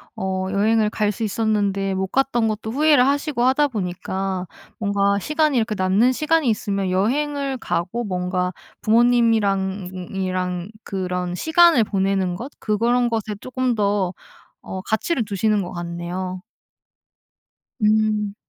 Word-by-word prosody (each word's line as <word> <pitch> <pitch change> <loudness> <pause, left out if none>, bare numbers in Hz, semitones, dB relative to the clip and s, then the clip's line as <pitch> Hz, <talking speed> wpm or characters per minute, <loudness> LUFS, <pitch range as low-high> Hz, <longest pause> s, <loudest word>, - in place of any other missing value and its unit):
어 190 0 -2
여행을 215 +2 +2
갈 210 -1 0
수 220 - -5
있었는데 200 -3 0
못 190 0 0
갔던 250 -4 +1
것도 220 0 -3
후회를 290 -1 +4
하시고 285 -3 0
하다 290 +3 +3
보니까 190 -3 -3 0.3
뭔가 200 -1 +1
시간이 305 +1 +1
이렇게 220 -1 0
남는 195 +6 +3
시간이 310 +1 +1
있으면 200 -3 -1
여행을 275 +7 0
가고 225 +2 -2
뭔가 180 -2 -2 0.3
부모님이랑 215 -5 +2 0.2
이랑 185 -1 -2
그런 180 -2 -3
시간을 320 - +5
보내는 190 -2 0
것 250 +9 -7
그런 235 +3 +1
것에 220 -2 -2
쪼끔 255 -1 -1
더 200 -3 0 0.5
어 190 - -5
가치를 220 - -1
두시는 210 +1 +1
것 180 - -5
같네요. 175 +2 -5 1.4
음. 210 -1 +2
210 Hz, 275 characters per minute, -22 LUFS, 190-240 Hz, 1.4 s, 시간을